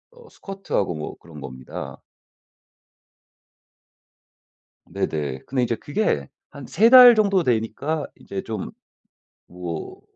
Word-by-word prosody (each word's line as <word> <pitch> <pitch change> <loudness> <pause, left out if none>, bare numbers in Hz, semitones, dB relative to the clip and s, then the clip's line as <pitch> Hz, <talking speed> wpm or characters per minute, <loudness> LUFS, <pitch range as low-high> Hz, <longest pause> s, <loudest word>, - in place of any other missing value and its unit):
어 480 -1 -17
스쿼트하고 195 - -3
뭐 75 - -7
그런 80 -3 -13
겁니다. 65 -1 -8 2.9
네네. 70 -4 -3
근데 130 -1 -1
이제 120 -1 0
그게 145 - -1 0.2
한 140 - -11
3 210 - +3
달 250 -1 +10
정도 200 -4 +2
되니까 130 +5 -1
이제 100 -1 -7
좀 110 -3 -5 0.8
뭐 90 -2 -7
120 Hz, 185 characters per minute, -23 LUFS, -, 2.9 s, 달